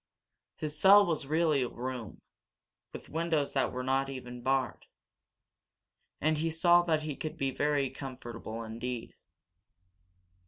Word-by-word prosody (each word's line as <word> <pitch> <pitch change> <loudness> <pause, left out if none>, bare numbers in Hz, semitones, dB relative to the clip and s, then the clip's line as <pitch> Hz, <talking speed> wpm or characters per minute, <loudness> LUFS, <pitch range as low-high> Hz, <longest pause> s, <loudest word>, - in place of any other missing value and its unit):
His 150 -1 -4
cell 200 +5 +8
was 160 -5 -1
really 155 -2 +2
a 125 - 0
room, 125 -4 -6 0.7
with - - -9
windows 160 -3 0
that 135 - +1
were 125 0 -4
not 135 +1 +1
even 125 -2 -7
barred. 135 +1 -1 1.3
And 155 +1 +1
he 165 +1 0
saw 175 +2 +5
that 160 -3 0
he 150 -2 -3
could 155 - -5
be 135 -1 0
very 145 -1 0
comfortable 120 -4 -7
indeed. 115 +2 -5
135 Hz, 130 wpm, -31 LUFS, 125-155 Hz, 1.3 s, cell